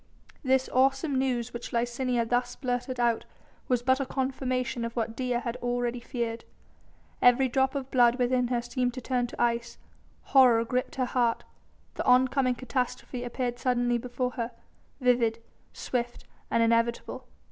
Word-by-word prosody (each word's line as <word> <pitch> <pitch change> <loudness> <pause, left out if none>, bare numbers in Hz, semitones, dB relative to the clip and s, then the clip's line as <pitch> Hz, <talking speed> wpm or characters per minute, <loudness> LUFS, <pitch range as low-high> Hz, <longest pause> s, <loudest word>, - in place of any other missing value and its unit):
The 265 -1 +2
awesome 270 +2 +2
news 250 -3 -1
which 235 0 -6
Licinia 240 0 0
thus 245 +1 0
blurted 250 0 -3
out 235 -1 +2 0.4
was 245 -2 +1
but 260 +1 +3
a 275 - -1
confirmation 255 -2 -2
of 230 0 -4
what 225 -1 -2
Dea 250 -1 -1
had 240 -1 -4
already 245 0 -2
feared. 235 -1 -4 0.8
Every 245 +2 +5
drop 265 +2 +1
of 270 -1 -4
blood 240 -2 +5
within 250 0 +1
her 240 -1 -1
seemed 245 0 -1
to 255 - -5
turn 245 0 0
to - - -11
ice, 235 0 0 0.5
horror 245 -4 +5
gripped 250 +2 -2
her 255 - 0
heart, 240 -2 0 0.5
the - - -4
oncoming 255 0 +3
catastrophe 250 0 -3
appeared 245 0 -3
suddenly 245 -1 +1
before 250 +1 -3
her, 230 0 -3 0.5
vivid, 240 -3 +2 0.3
swift 240 -1 -3 0.3
and 230 - +3
inevitable. 230 +1 0
245 Hz, 150 wpm, -28 LUFS, 235-255 Hz, 0.8 s, Every